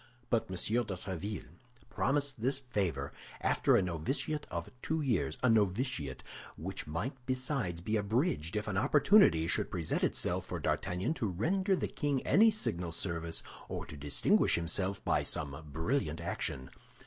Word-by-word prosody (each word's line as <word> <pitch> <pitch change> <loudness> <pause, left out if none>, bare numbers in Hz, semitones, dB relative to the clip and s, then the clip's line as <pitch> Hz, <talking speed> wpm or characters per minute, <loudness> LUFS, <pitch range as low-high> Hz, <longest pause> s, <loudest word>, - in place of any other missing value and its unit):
But 115 -2 +2
M. 95 - -4
de 115 +7 +1
Tréville 95 +3 -5 0.5
promised 135 +4 +1
this 130 +3 +1
favor 95 - -2 0.3
after - - +3
a - - +4
novitiate 90 - -2
of 85 0 -4
two 160 +1 -1
years—a 110 - 0
novitiate 105 - +1 0.3
which 95 +2 -5
might 85 - -2
besides 130 - -1
be 110 +5 0
abridged 105 - 0
if 105 0 -2
an 100 -3 -1
opportunity 150 - +5
should - - +1
present 80 -3 -1
itself - - +2
for - - -4
D'Artagnan 95 - -1
to 115 - -2
render 185 - +1
the - - -1
king 145 -4 -1
any 225 +3 +6
signal 90 - -1
service, 85 -1 -1 0.3
or - - -4
to - - -9
distinguish 75 0 +3
himself 95 +4 -1
by - - +3
some 70 -2 -2 0.2
brilliant 80 - -1
action. 65 -1 -3
100 Hz, 150 wpm, -33 LUFS, 85-130 Hz, 0.5 s, any